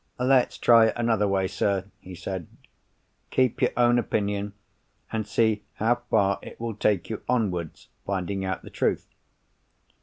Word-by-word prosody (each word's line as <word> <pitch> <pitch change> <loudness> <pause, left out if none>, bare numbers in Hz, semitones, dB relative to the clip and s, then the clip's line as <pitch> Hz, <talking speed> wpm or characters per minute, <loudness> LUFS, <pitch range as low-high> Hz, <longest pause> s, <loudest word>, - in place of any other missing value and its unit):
"Let's 125 0 +3
try 115 -1 +6
it - - 0
another 115 -3 +2
way, 95 -1 +1
sir," 95 0 0
he 90 0 -10
said. 90 0 -5 0.8
"Keep 130 -3 +1
your 125 - +4
own 120 0 +4
opinion, 105 -2 -2 0.6
and 110 -2 -2
see 110 0 +1
how 120 +3 +1
far 100 -3 +2
it - - -11
will 115 -1 -3
take 100 -4 0
you 110 - -2
towards 95 -11 -2 0.2
finding 95 0 -2
out 95 0 -3
the - - -11
truth. - - -1
105 Hz, 150 wpm, -26 LUFS, 95-115 Hz, 0.8 s, try